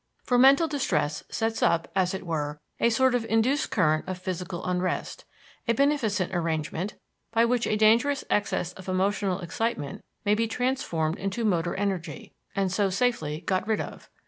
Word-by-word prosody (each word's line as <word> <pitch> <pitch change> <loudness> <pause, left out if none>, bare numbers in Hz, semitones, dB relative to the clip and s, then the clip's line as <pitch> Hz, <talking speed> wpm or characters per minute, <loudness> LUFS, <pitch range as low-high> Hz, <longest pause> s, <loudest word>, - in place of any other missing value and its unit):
For 245 -1 +2
mental 275 +5 +6
distress 265 - -1
sets 225 0 -1
up, 165 -1 +2
as 185 -1 +2
it 190 - -6
were, 150 -3 -2 0.2
a 235 - +4
sort 260 +2 +3
of 245 -2 +1
induced 230 +7 +1
current 155 -5 +2
of 185 -1 -3
physical 180 -1 -5
unrest; 180 0 -2 0.4
a 230 - +3
beneficent 225 -9 +1
arrangement, 165 +3 -2 0.4
by 230 0 +4
which 240 0 +1
a - - +1
dangerous 230 +6 +3
excess 190 -3 0
of 185 0 -9
emotional 195 0 0
excitement 175 -4 -3 0.2
may 205 - +4
be 225 +2 +1
transformed 235 - -1
into 195 +4 -2
motor 175 -4 +1
energy, 190 -6 -3 0.2
and 195 -2 +1
so 195 +1 +2
safely 185 -8 0
got 185 +1 -1
rid 220 -1 +1
of. - - -7
195 Hz, 165 wpm, -27 LUFS, 175-230 Hz, 0.4 s, mental